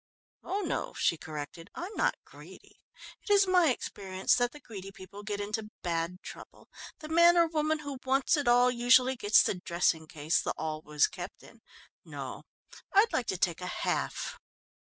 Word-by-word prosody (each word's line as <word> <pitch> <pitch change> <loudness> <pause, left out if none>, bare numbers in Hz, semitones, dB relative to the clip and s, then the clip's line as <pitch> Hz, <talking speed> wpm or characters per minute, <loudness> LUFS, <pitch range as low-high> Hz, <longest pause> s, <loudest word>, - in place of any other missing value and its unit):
"Oh 390 +3 -2
no," - - -3
she - - +2
corrected. 155 +1 -8
"I'm 360 +5 -6
not - - +1
greedy. - - -15 0.4
It 415 - -5
is 400 -1 +6
my 360 -4 +4
experience 190 -6 -1
that 245 -1 +1
the 295 - -12
greedy 195 -8 -9
people 195 +1 -11
get 205 -1 -4
into 210 +1 -3
bad 170 +1 -2
trouble. - - -12 0.3
The 305 - -7
man 340 +2 +6
or 340 - +6
woman 315 -1 0
who 285 -3 -7
'wants 270 +4 +2
it 290 -4 -2
all' 245 +1 +5
usually 250 +2 +4
gets 210 -3 +5
the - - 0
dressing 170 -2 +1
case 155 +1 0
the - - -2
'all' 155 -1 -3
was 150 -1 +2
kept - - -8
in. - - -17 0.4
No, - - -7 0.5
I'd 420 +3 +4
like 245 - 0
to 190 - -1
take 175 -1 0
a 180 - -4
half." - - -2
235 Hz, 180 wpm, -30 LUFS, -, 0.5 s, is